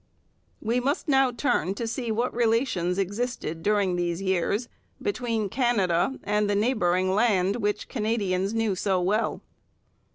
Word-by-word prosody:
We 235 +3 +1
must 280 +6 -1
now 270 -2 +4
turn 235 - 0
to 230 - -3
see 235 +1 -3
what 235 +3 -1
relations 225 -6 +1
existed 200 -4 -3
during 200 -2 +1
these 175 -1 -1
years 195 +4 0 0.3
between 235 - -1
Canada 225 -2 +1
and 210 0 +1
the 205 - +2
neighbouring 185 -5 +1
land 200 -2 +2
which 210 -2 -1
Canadians 210 -4 -1
knew 225 -3 +1
so 190 0 0
well. 205 +5 0
210 Hz, 135 wpm, -26 LUFS, 185-240 Hz, 0.3 s, now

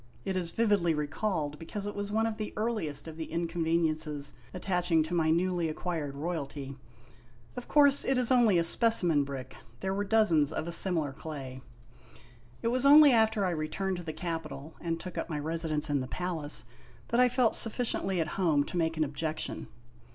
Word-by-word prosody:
It 190 -1 -2
is 180 -2 -1
vividly 200 -5 +2
recalled 150 0 -2
because 195 +5 -5
it 205 - -4
was 205 0 -4
one 220 +1 +1
of 225 -1 -2
the 215 - -5
earliest 210 -11 -2
of 160 -1 -8
the 160 - -6
inconveniences 165 -3 -1 0.2
attaching 175 -3 +1
to 160 +3 -6
my 160 -2 +2
newly 175 0 +1
acquired 155 -3 -4
royalty. 140 -3 -4 0.8
Of 245 - -7
course 285 -2 +5
it 270 - +1
is 250 0 +4
only 235 -7 +5
a 170 - +3
specimen 175 -6 +2
brick 135 -2 -7 0.2
there 190 0 -2
were 200 +1 -1
dozens 195 -8 +3
of 155 - -3
a - - -3
similar 170 -5 0
clay. 135 -4 -7 1.0
It 230 - +2
was 250 +2 0
only 290 +1 +8
after 220 -3 +3
I 180 - +1
returned 175 +4 -2
to 175 - -7
the 160 - -4
capital 160 -3 -5
and 165 -1 -2
took 180 0 -6
up - - -4
my 155 - -2
residence 155 0 -2
in 145 -2 0
the 130 - -5
palace, 160 -5 -2 0.4
that 235 - +1
I 250 0 +6
felt 250 -2 +2
sufficiently 220 -5 0
at 165 - 0
home 155 -6 +3
to 180 - -6
make 165 -1 0
an 155 - +2
objection. 155 +2 -3
170 Hz, 185 wpm, -30 LUFS, 155-205 Hz, 1.0 s, only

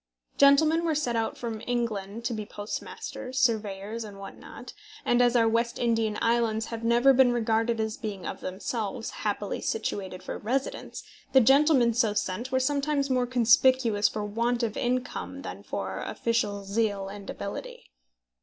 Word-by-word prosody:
Gentlemen 310 +4 +5
were 325 -2 +1
sent 255 -6 0
out 225 -1 -1
from 225 -3 -5
England 230 -3 -2
to 240 - 0
be 215 -1 -3
postmasters, 210 +5 -6
surveyors, 220 -2 0
and 205 -2 -10
what 195 0 -9
not; - - -11 0.3
and 240 0 +3
as 245 0 +3
our 230 -1 +5
West 235 +1 0
Indian 225 -3 +1
islands 230 -1 +1
have 225 0 -5
never 240 +4 +5
been 260 -1 +5
regarded 230 -1 +1
as 220 0 -2
being 205 -5 -6
of - - -5
themselves 205 +4 -4
happily 205 -1 -3
situated 190 -4 -3
for - - -5
residence, 260 +5 -3 0.3
the 265 - +8
gentlemen 270 -1 +5
so 220 -3 +1
sent 210 +5 -2
were 260 - +2
sometimes 280 +1 0
more 250 -1 +2
conspicuous 240 -2 +4
for 210 -1 -4
want 235 +3 0
of 225 -2 -1
income 250 +1 -2
than - - -7
for - - -4
official 210 -4 -1
zeal 200 -1 -1
and 200 0 -9
ability. 200 - -7
230 Hz, 160 wpm, -27 LUFS, 210-250 Hz, 0.3 s, the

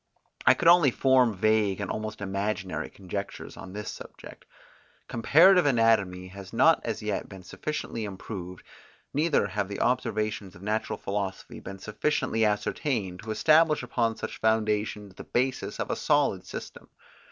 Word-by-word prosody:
I - - +8
could - - 0
only 170 -4 +7
form 125 -3 +3
vague, 105 -1 +2
and 100 - -3
almost 110 -1 -5
imaginary, 100 0 -3
conjectures 100 +1 -6
on 95 - -10
this 105 +1 -5
subject. - - -12 0.6
Comparative 170 - +5
anatomy 110 -7 +2
has 95 0 -10
not 155 +8 +5
as 115 -1 -4
yet 105 -2 -3
been 95 -1 -11
sufficiently 115 0 -4
improved; 95 -2 -7 0.5
neither 150 -4 +2
have 100 0 -2
the 100 - -6
observations 110 -5 -1
of 90 - -13
natural 110 +2 -2
philosophy 100 -1 -4
been 95 - -8
sufficiently 110 +2 -1
ascertained, 105 - -1
to 110 - -10
establish 155 +6 +4
upon 115 -2 0
such - - -6
foundations 105 -2 0
the - - -10
basis 130 +1 -2
of - - -2
a - - 0
solid - - +1
system. - - -8
110 Hz, 145 wpm, -27 LUFS, 100-125 Hz, 0.6 s, I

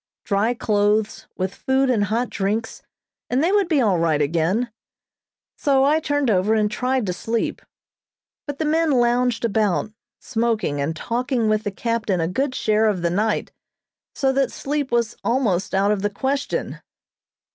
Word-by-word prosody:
Dry 215 +4 +1
clothes, 210 -1 0
with 185 +1 -2
food 265 +1 +1
and 210 -4 +2
hot 230 +4 -1
drinks, 210 +3 -2 0.5
and 255 +4 +1
they 345 - +2
would 405 -3 +3
be 315 -5 +2
all 200 -7 +2
right 160 -3 +2
again; 170 +11 0 0.9
so 270 -2 +3
I 300 +3 +3
turned 290 -5 0
over 200 +3 +2
and 210 -1 +1
tried 255 +1 0
to 180 - -1
sleep, 225 +6 -2 0.9
but 285 -1 -4
the 315 - -1
men 320 +1 +2
lounged 245 -2 +2
about, 215 -2 0 0.3
smoking 220 - -1
and 155 +3 -2
talking 240 - -1
with 215 0 0
the 205 - -1
captain 220 -2 -1
a 165 - 0
good 260 +9 -1
share 215 0 +2
of 190 -5 0
the 170 - +1
night, 210 +4 0 0.6
so 270 -2 +1
that 270 0 +1
sleep 285 -1 -3
was 235 -1 +1
almost 215 -8 0
out 200 +2 +3
of 205 -2 0
the 205 - 0
question. 270 +7 -2
225 Hz, 165 wpm, -22 LUFS, 200-265 Hz, 0.9 s, would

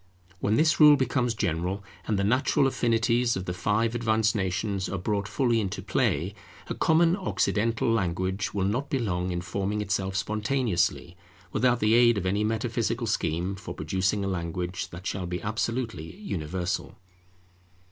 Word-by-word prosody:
When 105 +4 +1
this 155 +3 +3
rule 150 -1 +9
becomes 125 -2 0
general, 90 0 -1 0.2
and 105 - +1
the 100 - +1
natural 130 +5 +2
affinities 120 -1 +2
of 95 - -4
the 90 - -3
five 105 +5 0
advanced 110 -2 +1
nations 95 0 -1
are 100 - -2
brought 100 +2 -1
fully 120 -4 +1
into 95 -3 -4
play, 95 +5 0 0.4
a - - -1
common 165 +1 +3
Occidental 115 - 0
language 95 -2 0
will 95 -2 -1
not 125 +8 -1
be 135 - +1
long 90 -7 -1
in 85 0 -2
forming 100 +4 -2
itself 95 -2 -1
spontaneously, 105 -4 0 0.3
without 125 +1 +2
the 110 +1 +3
aid 120 -1 +5
of 95 - -2
any 100 +3 +1
metaphysical 115 +2 -1
scheme 90 -3 -1
for 95 -1 -8
producing 95 +5 0
a - - -1
language 90 0 -3
that 85 +2 -10
shall 95 -3 -3
be 90 0 -3
absolutely 110 -4 -3
universal. 90 - -3
105 Hz, 155 wpm, -27 LUFS, 95-115 Hz, 0.4 s, rule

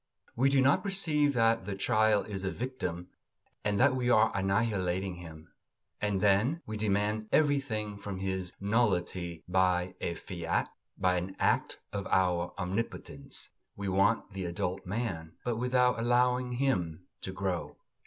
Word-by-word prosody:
We 130 +3 +3
do 135 -1 +4
not 135 +2 +4
perceive 160 -8 +1
that 115 -4 +3
the 100 0 -3
child 110 +1 +2
is 100 -2 -5
a 95 - 0
victim 90 -8 -4 0.5
and 100 -1 0
that 130 0 +5
we 125 -1 0
are 110 -2 +5
annihilating 95 -2 0
him; 80 -1 -11 0.5
and 105 -2 0
then 105 - +3
we 110 - -5
demand 105 +1 0
everything 130 -9 +1
from 100 -1 -5
his 95 -1 -2
nullity 90 -6 0
by 90 0 +2
a 85 - -2
fiat, 85 -2 -2 0.3
by 90 -1 +2
an 95 +2 -4
act - - +1 0.2
of 100 -1 -3
our 90 -2 +1
omnipotence. 100 +5 -4 0.3
We 100 -1 -3
want 100 +2 +2
the 95 -1 -4
adult 90 +1 -3
man, 95 -7 -3
but 120 -2 0
without 125 0 +2
allowing 125 +1 +2
him 90 -11 -1 0.2
to 95 - -4
grow. 95 -2 -3
100 Hz, 145 wpm, -30 LUFS, 90-120 Hz, 0.5 s, that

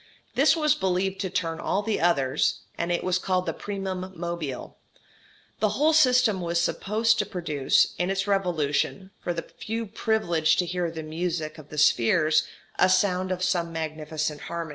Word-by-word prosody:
This 290 +4 +4
was 305 -2 +3
believed 190 -5 -1
to 190 - -2
turn 165 -2 -2
all 200 - -1
the 220 0 -1
others, 140 -7 +1
and 170 +1 -2
was 185 0 +1
called 185 -1 0
the - - -2
primum 190 -2 -5
mobile. 170 -6 -5 0.8
The 215 -1 +1
whole 310 +3 +4
system 255 -9 +4
was 170 0 0
supposed 220 +6 +1
to 210 - +1
produce, 155 -9 +1
in 180 +1 0
its 195 0 0
revolution, 190 -1 0
for 175 - -1
the 170 -1 -3
few 225 +1 -5
privileged 175 -7 +1
to 180 - +2
hear 175 0 -2
the 160 -1 -6
music 160 0 -3
of 150 -1 -13
the 150 - -9
spheres, 155 +4 +3 0.3
a 185 - +5
sound 185 0 +2
as - - +2
of 180 - -5
some 175 -2 0
magnificent 155 -1 -3
harmony. 170 -1 -5
180 Hz, 170 wpm, -26 LUFS, 160-195 Hz, 0.8 s, a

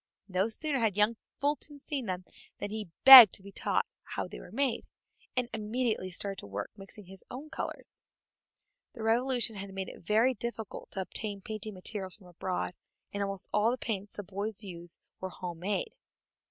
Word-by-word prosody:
No 190 +2 +1
sooner 285 +4 -1
had 220 -4 +1
young 210 +2 +4 0.2
Fulton 290 0 0
seen 275 -3 -4
them 185 -1 -3 0.3
than 205 - -4
he 215 -4 -4
begged 260 -7 +13
to 190 - -8
be 200 - -10
taught - - 0 0.2
how - - -4
they - - -9
were - - -11
made, 255 0 0 0.5
and 250 -1 +2
immediately 220 -2 -1
started 195 +2 -2
to - - -7
work 100 +1 -5
mixing 195 +1 -9
his 190 +1 -8
own 285 +5 -8
colors. - - -6 0.9
The 230 - -7
Revolution 235 -1 +1
had 195 0 -6
made 190 -1 -3
it - - -12
very 220 +8 +3
difficult 230 -2 -5
to 190 - -2
obtain 200 +1 -2
painting 215 -1 -5
materials 190 0 -2
from 205 - -18
abroad, 180 +1 -3 0.4
and 200 - -2
almost 195 -1 -1
all 210 +2 +4
the 250 - 0
paints 205 -5 -3
the 205 - -3
boys 205 +3 -3
used 175 -3 -6 0.2
were 190 - -4
home 175 -2 -7
made. 205 - -2
210 Hz, 180 wpm, -31 LUFS, 190-235 Hz, 0.9 s, begged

